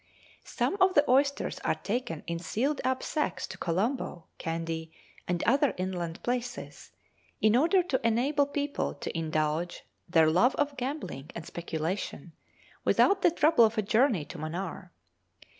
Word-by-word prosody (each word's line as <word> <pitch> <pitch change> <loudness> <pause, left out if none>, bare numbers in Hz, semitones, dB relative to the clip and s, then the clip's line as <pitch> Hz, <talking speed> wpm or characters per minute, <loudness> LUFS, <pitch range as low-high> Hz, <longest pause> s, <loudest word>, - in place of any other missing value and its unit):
Some 395 - -1
of 370 0 +5
the 290 0 +5
oysters 280 +2 +2
are - - 0
taken 215 -7 -3
in 170 0 -3
sealed 250 - -1
up 260 0 0
sacks 300 - -1
to - - -9
Colombo, 185 +1 -1 0.2
Kandy, 165 0 -3 0.4
and 175 -1 -1
other 275 +3 +3
inland 180 -3 -3
places, 245 0 -4 0.5
in 215 +1 +4
order 340 +8 +4
to 275 -7 -1
enable 270 +6 +2
people 285 0 -2
to - - -6
indulge 160 +1 -1 0.3
their 165 -2 +5
love 185 +11 +4
of 290 -1 0
gambling 255 - -5
and 170 - -6
speculation, 170 0 -4 0.5
without 395 -1 +4
the 350 - +6
trouble 320 -6 +4
of 225 +1 +2
a 215 - +2
journey 220 - +2
to - - -9
Manaar. 175 +3 -5
220 Hz, 145 wpm, -29 LUFS, 170-280 Hz, 0.5 s, the